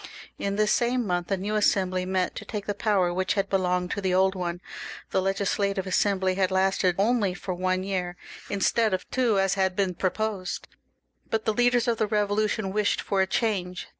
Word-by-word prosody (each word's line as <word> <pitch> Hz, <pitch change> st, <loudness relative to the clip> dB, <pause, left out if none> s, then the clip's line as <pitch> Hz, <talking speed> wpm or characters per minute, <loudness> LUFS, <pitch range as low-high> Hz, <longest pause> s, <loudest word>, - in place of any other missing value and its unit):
In 200 Hz, 0 st, -1 dB
this 210 Hz, 0 st, +2 dB
same 245 Hz, 0 st, +1 dB
month 175 Hz, -2 st, -1 dB
a 195 Hz, -, +1 dB
new 200 Hz, +3 st, -3 dB
Assembly 185 Hz, -3 st, +1 dB
met 185 Hz, -1 st, 0 dB
to -, -, -5 dB
take 210 Hz, -2 st, -5 dB
the 205 Hz, -, -1 dB
power 195 Hz, -4 st, +1 dB
which 185 Hz, +2 st, 0 dB
had 195 Hz, -1 st, -1 dB
belonged 180 Hz, -2 st, +1 dB
to 205 Hz, -, -2 dB
the 185 Hz, -1 st, +1 dB
old 190 Hz, +1 st, +4 dB
one. 175 Hz, -2 st, -3 dB, 0.5 s
The 190 Hz, -, +2 dB
Legislative 195 Hz, 0 st, 0 dB
Assembly 190 Hz, 0 st, +1 dB
had 190 Hz, -1 st, +1 dB
lasted 190 Hz, -1 st, +2 dB
only 205 Hz, -2 st, +2 dB
for 185 Hz, 0 st, -4 dB
one 185 Hz, +1 st, 0 dB
year, 180 Hz, -2 st, -3 dB, 0.3 s
instead 205 Hz, +1 st, +2 dB
of -, -, -7 dB
two 240 Hz, -6 st, +2 dB
as 195 Hz, 0 st, +2 dB
had 190 Hz, -1 st, +1 dB
been 190 Hz, -2 st, +1 dB
proposed; 195 Hz, +1 st, -2 dB, 0.6 s
but 220 Hz, -1 st, -1 dB
the 220 Hz, -, +2 dB
leaders 245 Hz, +1 st, +3 dB
of 230 Hz, -2 st, +1 dB
the 215 Hz, -, +2 dB
Eevolution 210 Hz, -1 st, 0 dB
wished 210 Hz, -1 st, +1 dB
for 195 Hz, -2 st, 0 dB
a 190 Hz, -, +2 dB
change. 190 Hz, -4 st, -1 dB
195 Hz, 195 wpm, -26 LUFS, 185-210 Hz, 0.6 s, old